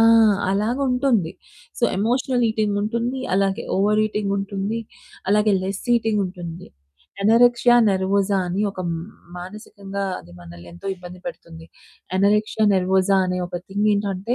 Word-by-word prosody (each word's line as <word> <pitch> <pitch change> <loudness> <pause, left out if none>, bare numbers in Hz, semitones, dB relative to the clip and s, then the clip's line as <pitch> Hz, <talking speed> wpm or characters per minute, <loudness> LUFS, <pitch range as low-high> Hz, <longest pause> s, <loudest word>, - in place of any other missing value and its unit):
ఆ! - - +6 0.5
అలాగా 215 +7 0
ఉంటుంది. 245 -10 +1 0.5
So, - - -9 0.2
emotional 245 +3 +1
ఈటింగుంటుంది. 220 +4 -1
అలాగే 195 0 +1
ఓవర్ 210 +2 +3
ఈటింగుంటుంది. 200 +1 -2 0.5
అలాగే 210 +1 +3
లెస్ 195 +1 -4
ఈటింగుంటుంది. 185 -6 -3 0.6
ఎనోరెక్సియా 240 +2 +5
నెర్వోసా 195 +1 +1
అని 185 +3 -2
ఒక 195 -2 -7
హ్మ్, 165 -1 -2 0.4
మానసికంగా 200 +1 -7 0.2
అది 85 - -14
మనల్ని 85 0 -12
ఎంతో 85 - -11
ఇబ్బంది 180 0 -11
పెడుతుంది. 165 -10 -9 0.5
ఎనోరెక్సియా 210 +2 +2
నెర్వోసా 190 +1 +2
అనే 180 0 -2
ఒక 175 0 -5
థింగ్ 205 +2 0
ఏంటంటే 200 +2 -1
200 Hz, 120 wpm, -22 LUFS, 185-220 Hz, 0.6 s, ఆ